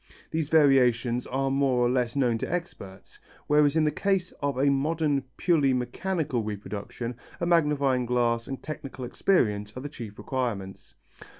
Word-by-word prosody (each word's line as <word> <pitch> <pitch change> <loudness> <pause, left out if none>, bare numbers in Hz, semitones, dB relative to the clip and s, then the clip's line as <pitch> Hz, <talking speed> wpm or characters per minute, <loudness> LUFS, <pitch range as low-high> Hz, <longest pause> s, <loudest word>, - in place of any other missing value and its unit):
These 160 -2 -1
variations 125 -5 +3
are 135 +1 -1
more 135 -3 +2
or - - +4
less 125 -1 0
known 120 -5 +1
to - - -4
experts, 100 - -6 0.3
whereas 150 0 +3
in 160 - +3
the 150 - +2
case 195 -1 0
of 140 -2 -1
a 140 +1 +3
modern 145 -1 0
purely 150 -7 +3
mechanical 135 +1 -1
reproduction, 105 +3 -5 0.2
a 170 - -1
magnifying 145 -7 +2
glass 120 -1 +1
and 135 -1 -6
technical 135 -4 -6
experience 105 - 0
are - - -5
the 145 - -5
chief 115 -7 -9
requirements. 115 -8 -4
135 Hz, 155 wpm, -27 LUFS, 120-150 Hz, 0.3 s, or